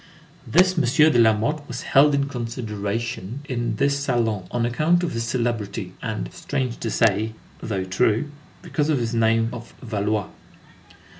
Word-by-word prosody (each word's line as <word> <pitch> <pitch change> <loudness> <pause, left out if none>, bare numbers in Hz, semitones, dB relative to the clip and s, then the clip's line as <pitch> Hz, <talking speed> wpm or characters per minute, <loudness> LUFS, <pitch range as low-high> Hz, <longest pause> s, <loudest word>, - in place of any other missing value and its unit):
This 185 +3 +4
M. - - +2 0.3
de 120 - +3
Lamothe 115 +7 +3
was 125 +1 -5
"held 145 +1 +5
in 140 0 +1
consideration" 115 -2 -4
in 120 -3 -2
this 140 +4 +1
salon 115 -8 0
on 120 -1 0
account 155 +9 +2
of 170 - -1
his 115 0 -2
"celebrity" 115 -5 -2
and, 110 -4 -4
strange 130 -4 -3
to 115 - -2
say, 110 0 +2 0.3
though 100 -4 -2
true, 110 +8 +1 0.3
because 155 -3 -1
of 150 - +3
his 120 -1 -2
name 115 0 +2
of 120 -1 -9
Valois. 105 -3 -1
115 Hz, 150 wpm, -23 LUFS, 110-135 Hz, 0.3 s, held